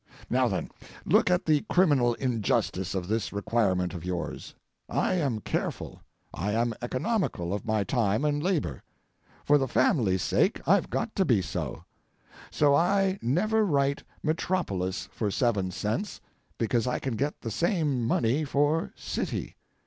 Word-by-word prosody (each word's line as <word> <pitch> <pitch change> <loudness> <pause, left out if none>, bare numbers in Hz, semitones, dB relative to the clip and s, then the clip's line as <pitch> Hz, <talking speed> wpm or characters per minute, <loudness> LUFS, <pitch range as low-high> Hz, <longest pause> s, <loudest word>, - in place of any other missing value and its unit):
Now, - - +3
then, - - -3 0.3
look - - +4
at 180 0 +2
the 155 -2 +3
criminal 140 -10 +3
injustice 105 -7 -1
of 90 -2 -2
this 110 +1 -1
requirement 100 -4 0
of 85 -3 -6
yours. 90 -2 -5 0.3
I - - +1
am 140 -11 0
careful, - - -3 0.3
I 100 +4 -2
am 115 +1 +1
economical 130 - -1
of 105 +3 -4
my 110 -2 +1
time 110 +3 +1
and 145 0 +1
labor. 150 - -1 0.6
For 145 0 +5
the 135 - 0
family's 95 - +2
sake - - +2
I've - - +3
got 225 -1 -2
to 195 - +4
be 120 - +3
so. - - -4 0.7
So 145 -2 +3
I 190 +5 +2
never 215 - +2
write 140 -6 +1 0.2
'metropolis' 155 - -1
for 105 - -2
seven 100 -4 +1
cents, 110 - -3 0.4
because 115 +1 0
I 125 - 0
can 130 -4 -3
get 140 +6 -2
the 115 - -4
same 155 - 0
money 120 +5 +1
for 145 +3 +1
'city.' - - -4
125 Hz, 150 wpm, -28 LUFS, 105-155 Hz, 0.7 s, For